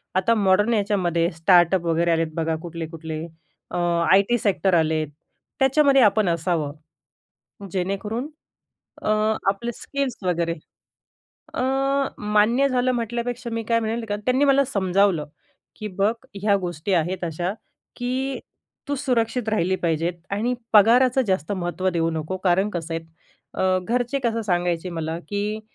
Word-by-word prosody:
आता 230 +5 +3
मॉडर्न 205 +2 +3
याच्यामध्ये 185 -6 +1
स्टार्टअप 175 +1 +4
वगैरे 170 +1 +2
आलेत 165 0 +1
बघा 165 -1 0
कुठले-कुठले. 160 -2 -6 0.5
अ, - - -3 0.3
आय 195 +1 +7
टी 240 - +3
सेक्टर 195 -3 +1
आलेत, 160 -1 +1 0.5
त्याच्यामध्ये 270 0 +4
आपण 210 -3 +4
असावं, 165 -3 -1 1.0
जेणेकरून 200 +8 -2 0.7
अ, - - -2 0.4
आपले 235 +5 -1
स्किल्स 275 +1 -3
वगैरे 170 -2 0 1.0
अ, - - -1 0.6
मान्य 210 +6 +3
झालं 255 0 +1
म्हटल्यापेक्षा 240 +1 -3
मी 230 0 -2
काय 230 0 +2
म्हणेल 225 +1 -2
का 205 - -1
त्यांनी 255 +3 +3
मला 275 0 +4
समजावलं 195 - +1 0.5
की 215 - -4
"बघ 205 +3 +3 0.3
ह्या 205 -1 +4
गोष्टी 175 +1 -3
आहेत 175 +2 0
अशा 175 +3 -2 0.4
की 260 +2 -2 0.5
तू 285 - 0
सुरक्षित 245 -3 0
राहिली 190 -3 +1
पाहिजेत 165 +1 0 0.2
आणि 225 +5 0 0.2
पगाराचं 245 +5 +5
जास्त 185 -1 0
महत्त्व 185 0 -2
देऊ 165 -1 0
नको." 160 +3 -3
कारण 190 +3 +3
कसं 165 -2 -4
आहेत, 165 0 -5 0.5
अ, 185 0 +2
घरचे 245 +3 0
कसं 230 -1 0
सांगायचे 175 -2 -1
मला 165 0 -3
की 210 +1 -2
195 Hz, 135 wpm, -23 LUFS, 170-235 Hz, 1.0 s, आय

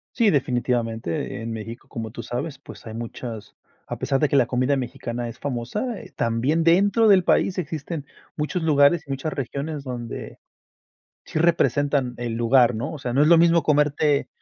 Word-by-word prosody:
Sí, 230 -4 +4
definitivamente. 120 - -1
En 115 0 -5
México, 115 +1 -7
como 110 -2 -6
tú - - -7
sabes, 130 +3 -4
pues, - - -13
hay 110 - -7
muchas 115 -1 -7 0.3
a - - -5
pesar 135 -1 0
de 150 - +2
que - - +1
la 130 -3 +5
comida 130 +3 +1
mexicana 120 -1 -4
es 115 - -11
famosa, 145 - -3
eh, - - -12
también 125 +8 +1
dentro 200 +6 +4
del 190 -3 +6
país 190 +2 +2
existen 155 -2 -4 0.3
muchos 155 +4 -2
lugares 150 +1 +4
y - - -18
muchas 135 +3 -3
regiones 140 +3 -4
donde, 120 -3 -6 0.9
sí - - -3
representan 145 -6 +2
el 120 -2 -3
lugar, 120 +1 +4
¿no? 140 +9 -3
O 155 - -7
sea, 125 -2 -4
no 140 - +4
es 150 - +4
lo 170 -1 +7
mismo 170 -1 +4
comerte 150 -1 +2
140 Hz, 180 wpm, -23 LUFS, 120-160 Hz, 0.9 s, lo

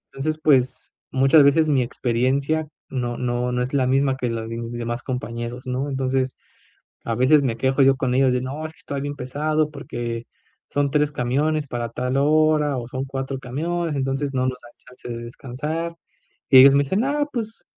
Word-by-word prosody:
Entonces, 155 +3 -2
pues, 130 -4 +2 0.2
muchas 135 +4 +5
veces 155 +3 +4
mi 140 -3 +3
experiencia 130 +6 0 0.2
no 120 -2 -3
no 125 0 -1
no 125 0 0
es 130 +3 -5
la 130 -2 +2
misma 135 0 +2
que 125 -2 -2
la 115 -1 -3
de 115 +1 -5
mis 115 0 -5
demás 120 0 -4
compañeros, 120 0 -5
¿no? 130 +3 -2
Entonces, 130 -1 -1 0.7
a 115 - -2
veces, 135 +5 +5
me 120 -4 -1
quejo 130 +3 +2
yo 135 0 +5
con 130 -2 -1
ellos 130 0 +4
de: 125 - +1
"No, 135 +5 -5
es 155 - -5
que - - -22
estoy 140 -1 -5
bien 145 +1 -4
pesado, 150 +4 -1
porque 120 -4 -5 0.4
son 145 -1 0
3 150 -1 +2
camiones 145 +4 0
para 120 -3 -3
tal 125 +3 -2
hora 150 0 +3
o 120 -2 -4
son 130 +2 -4
4 135 0 -4
camiones, 160 +5 -2
entonces, 135 +1 -1
no 130 -1 0
nos 125 -1 -3
da 120 - -14 0.2
chance 125 -1 -12
de 120 0 -5
descansar". 150 +8 -5 0.5
Y 130 - +9
ellos 135 +1 +8
me 140 - +5
dicen: 190 +10 0
"Ah, 290 +1 0
pues, 225 -2 -5
135 Hz, 195 wpm, -23 LUFS, 125-145 Hz, 0.7 s, Y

